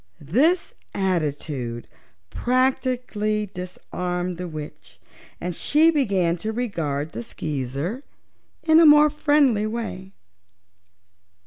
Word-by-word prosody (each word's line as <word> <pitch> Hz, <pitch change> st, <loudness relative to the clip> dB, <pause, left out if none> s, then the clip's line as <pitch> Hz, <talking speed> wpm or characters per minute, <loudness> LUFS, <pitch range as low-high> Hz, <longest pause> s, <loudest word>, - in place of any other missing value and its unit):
This 325 Hz, -, +3 dB, 0.2 s
attitude 145 Hz, -10 st, -2 dB, 0.4 s
practically 250 Hz, -4 st, 0 dB
disarmed 180 Hz, -1 st, -5 dB
the 180 Hz, 0 st, -5 dB
witch 155 Hz, -2 st, -9 dB, 0.4 s
and 180 Hz, 0 st, -4 dB
she 315 Hz, -, +4 dB
began 195 Hz, -, +1 dB
to 215 Hz, +6 st, -3 dB
regard 165 Hz, -, -2 dB
the 115 Hz, -, -5 dB
Skeezer 145 Hz, -, -4 dB, 0.6 s
in 315 Hz, 0 st, +6 dB
a 335 Hz, -, +7 dB
more 300 Hz, 0 st, +7 dB
friendly 285 Hz, -8 st, +2 dB
way. 215 Hz, -4 st, -5 dB
195 Hz, 95 wpm, -23 LUFS, 165-255 Hz, 0.6 s, a